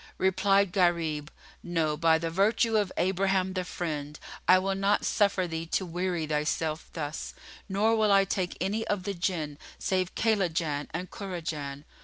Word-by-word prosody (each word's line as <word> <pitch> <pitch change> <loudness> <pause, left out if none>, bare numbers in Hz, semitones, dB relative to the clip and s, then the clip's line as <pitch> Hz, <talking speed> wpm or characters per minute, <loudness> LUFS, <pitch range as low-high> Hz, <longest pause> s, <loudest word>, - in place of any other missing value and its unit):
Replied 195 +1 +3
Gharib, 165 -5 +1 0.3
"No, 165 -3 0
by 160 +1 +4
the 165 0 -3
virtue 220 +5 +2
of 205 -3 +2
Abraham 190 0 +1
the 185 -1 -1
Friend, 150 -5 -4 0.3
I 185 - +8
will 195 +1 0
not 195 +2 +1
suffer 200 -3 +2
thee 165 -1 -4
to 185 - 0
weary 175 -1 -2
thyself 155 +1 -1
thus, 150 -1 -5 0.3
nor 210 +4 +2
will 215 -2 +3
I 195 0 +6
take 185 -2 -2
any 205 +5 -1
of 200 -3 -1
the 200 +1 -2
Jinn 165 -5 -2 0.2
save 185 -1 -1
Kaylajan 170 -9 0
and 180 +3 -5
Kurajan." 160 -7 -5
180 Hz, 155 wpm, -28 LUFS, 160-195 Hz, 0.3 s, I